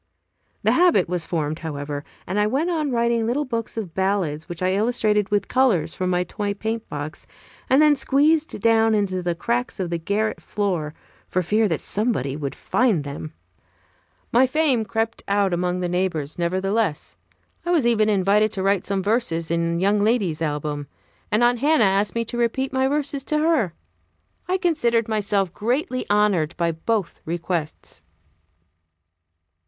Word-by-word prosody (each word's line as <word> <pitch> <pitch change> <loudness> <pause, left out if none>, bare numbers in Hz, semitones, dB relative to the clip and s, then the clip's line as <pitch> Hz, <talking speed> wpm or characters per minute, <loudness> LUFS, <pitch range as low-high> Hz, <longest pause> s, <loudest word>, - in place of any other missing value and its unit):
The - - +4
habit 340 - +4
was 175 -1 -2
formed, 155 -1 -2
however, 145 -2 -5 0.2
and 190 +3 -1
I 210 - +3
went 290 +10 0
on 310 -4 0
writing 235 -2 +1
little 280 +5 0
books 230 -3 -4
of 195 -7 -4
ballads, 190 -5 -1
which 175 +1 -5
I 185 - +2
illustrated 210 -1 +1
with 205 -1 0
colors 200 -12 +2
from 185 0 -2
my 180 0 +1
toy 200 +3 -3
paintbox, 200 -9 -5 0.4
and 265 - +5
then 300 -1 +6
squeezed 295 +2 +2
down 225 0 +4
into 190 -3 0
the 175 -1 -1
cracks 240 +5 -2
of 180 -2 -2
the 170 - -1
garret 205 +6 -1
floor, 175 -7 -2 0.3
for 185 - 0
fear 215 +5 +2
that 160 -5 -2
somebody 205 - 0
would 145 -2 -4
find 225 - +1
them. 145 +2 -7 1.0
My 255 +3 +5
fame 265 -5 +1
crept 225 +1 -2
out 200 -2 +2
among 180 +1 -1
the 180 - 0
neighbors, 175 -4 -2
nevertheless. 190 0 -1 0.5
I 345 - -4
was 330 -8 +3
even 215 -2 +3
invited 205 +2 +3
to 190 - -2
write 195 -1 +1
some 195 -1 -1
verses 200 -7 0
in 170 0 0
young 200 +3 +2
lady's 205 -7 +1
album; 150 -2 -2 0.4
and 215 +3 +3
Aunt 240 0 +3
Hannah 290 -2 +3
asked 200 +2 +1
me 230 0 0
to 240 +1 -5
repeat 260 +3 0
my 265 0 +2
verses 285 0 -1
to 305 - 0
her. 300 - +1 0.7
I 370 +1 +1
considered 240 - +1
myself 200 -4 0
greatly 255 - -1
honored 205 -6 +2
by 170 -1 +1
both 185 +3 -2
requests. 170 -1 -4
205 Hz, 160 wpm, -23 LUFS, 175-235 Hz, 1.0 s, then